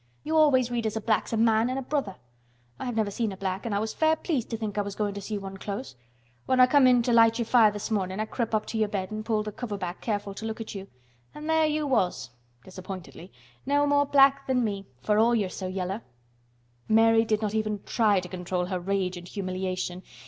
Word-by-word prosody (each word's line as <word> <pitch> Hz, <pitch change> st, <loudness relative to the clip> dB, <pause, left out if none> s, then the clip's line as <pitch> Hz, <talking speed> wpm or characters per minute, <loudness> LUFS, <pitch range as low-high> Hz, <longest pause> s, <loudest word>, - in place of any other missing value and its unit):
You 315 Hz, +1 st, -2 dB
always 265 Hz, -6 st, +4 dB
read 235 Hz, -2 st, -1 dB
as 215 Hz, 0 st, -3 dB
a -, -, 0 dB
black's 220 Hz, 0 st, 0 dB
a 225 Hz, -, 0 dB
man 225 Hz, +1 st, +3 dB
an' 255 Hz, -, -2 dB
a 270 Hz, -, -3 dB
brother. 260 Hz, -9 st, -2 dB, 0.6 s
I've 245 Hz, -2 st, -4 dB
never 215 Hz, -2 st, 0 dB
seen 220 Hz, +1 st, -1 dB
a 190 Hz, -, -8 dB
black 190 Hz, +3 st, -3 dB
an' 220 Hz, -, -2 dB
I -, -, +1 dB
was 220 Hz, +1 st, -2 dB
fair 315 Hz, 0 st, +3 dB
pleased 300 Hz, -7 st, -2 dB
to 225 Hz, -, -3 dB
think 215 Hz, -2 st, -4 dB
I 205 Hz, -, +1 dB
was 200 Hz, -1 st, -5 dB
goin' 205 Hz, -1 st, -1 dB
to 200 Hz, -, -6 dB
see 210 Hz, +1 st, -4 dB
one 195 Hz, -1 st, -7 dB
close. 195 Hz, -, -6 dB, 0.5 s
When 260 Hz, -, +2 dB
I 255 Hz, -, +9 dB
come 265 Hz, 0 st, +5 dB
in 245 Hz, -2 st, +5 dB
to 240 Hz, -, +1 dB
light 230 Hz, -1 st, +5 dB
your 235 Hz, -, -1 dB
fire 230 Hz, -2 st, +5 dB
this 205 Hz, +2 st, -6 dB
mornin' 190 Hz, -2 st, -1 dB
I 215 Hz, -, 0 dB
crep' 230 Hz, 0 st, -2 dB
up 215 Hz, -, 0 dB
to 225 Hz, -, -4 dB
your 215 Hz, -, +2 dB
bed 195 Hz, -2 st, -3 dB
an' 215 Hz, 0 st, -4 dB
pulled 215 Hz, -1 st, 0 dB
th' 210 Hz, -1 st, -6 dB
cover 220 Hz, -5 st, -4 dB
back 180 Hz, -1 st, -5 dB
careful 205 Hz, -3 st, -2 dB
to 220 Hz, -, -7 dB
look 220 Hz, 0 st, -5 dB
at 225 Hz, -, -6 dB
you. 195 Hz, -1 st, -7 dB, 0.5 s
An' 300 Hz, -, -8 dB
there 320 Hz, 0 st, +3 dB
you 305 Hz, 0 st, -1 dB
was," 180 Hz, -, 0 dB, 0.3 s
disappointedly, 185 Hz, -1 st, -9 dB, 0.3 s
"no 285 Hz, +1 st, +2 dB
more 285 Hz, 0 st, +3 dB
black 275 Hz, 0 st, +4 dB
than 255 Hz, -2 st, +2 dB
me—for 200 Hz, -, -2 dB
all 235 Hz, +2 st, +4 dB
you're 200 Hz, -5 st, 0 dB
so 185 Hz, -, -5 dB
yeller." 185 Hz, +3 st, -3 dB, 0.9 s
Mary 225 Hz, +1 st, +5 dB
did 220 Hz, -1 st, 0 dB
not 210 Hz, -1 st, -1 dB
even 215 Hz, -2 st, -2 dB
try 210 Hz, -4 st, +2 dB
to 180 Hz, -, -7 dB
control 180 Hz, 0 st, -3 dB
her 185 Hz, 0 st, -3 dB
rage 185 Hz, 0 st, -1 dB
and 175 Hz, 0 st, -10 dB
humiliation. 185 Hz, -2 st, -3 dB
215 Hz, 240 wpm, -27 LUFS, 195-240 Hz, 0.9 s, I